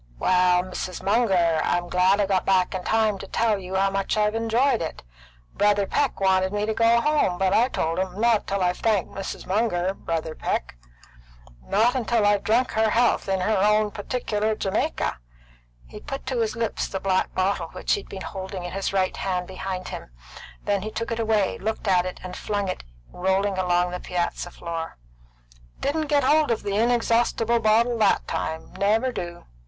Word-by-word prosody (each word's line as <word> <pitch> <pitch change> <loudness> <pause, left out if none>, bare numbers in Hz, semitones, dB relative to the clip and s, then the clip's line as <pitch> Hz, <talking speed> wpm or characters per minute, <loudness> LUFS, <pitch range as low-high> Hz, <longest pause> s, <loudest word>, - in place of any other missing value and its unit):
"Well, 180 - +3
Mrs. 185 0 -6
Munger, 190 -6 +2
I'm 175 0 0
glad 185 +3 +3
I 205 - +3
got 190 -1 +1
back 190 -1 +2
in 185 -1 -4
time 220 -2 +1
to 195 - -8
tell 220 -1 +1
you 185 0 -6
how 195 +1 +2
much 195 +1 -1
I've 210 0 +2
enjoyed 230 +3 +1
it. 160 - -5 0.5
Brother 205 -1 +2
Peck 275 +6 0
wanted 190 -1 +2
me 205 0 -1
to 220 - -1
go 230 +1 +4
home, 295 -12 +1
but 190 0 +1
I 235 +3 +4
told 165 -8 -2
him, 190 +1 -3
Not 230 -2 +2
till 195 -1 -1
I've 180 0 0
thanked 210 -5 +1
Mrs. 195 -1 -6
Munger, 190 -3 0
Brother 165 -4 -3
Peck; - - -3 0.9
not 235 +4 +1
till 230 -3 +2
I've 205 -1 +3
drunk 240 +4 +2
her 220 0 +2
health 230 -2 +2
in 190 -1 +1
her 215 +4 +1
own 190 - +2 0.2
old 210 - -5
particular 215 -1 -2
Jamaica." 195 - -1 0.7
He 210 - -11
put 275 +3 -7
to 255 -3 -2
his 225 0 0
lips 230 -1 -2
the 190 - -4
black 190 -1 0
bottle 190 +2 0
which - - -2
he 415 - +1
had - - -18
been 195 - -7
holding 190 -1 -6
in 175 - -5
his 195 0 -2
right 190 -1 0
hand 180 -2 -2
behind 185 0 -5
him; - - -7 0.5
then 205 -1 0
he 215 - -4
took 230 +2 -4
it 230 - -2
away, 220 -3 +1
looked 220 +1 -3
at 185 -1 +3
it, 185 - -7
and 180 0 -7
flung 205 -1 -2
it 185 - -4 0.3
rolling 190 +2 0
along 180 -1 +1
the 180 - -4
piazza 175 0 -3
floor. 165 - -6 0.8
"Didn't 310 +2 -1
get 285 -1 +2
hold 300 +3 +3
of 230 - -1
the 200 -1 -2
inexhaustible 235 0 +2
bottle 230 +2 +2
that 210 -2 +2
time; 160 0 -4
never 220 +6 +2
do. 175 -6 -6
200 Hz, 190 wpm, -24 LUFS, 185-225 Hz, 0.9 s, go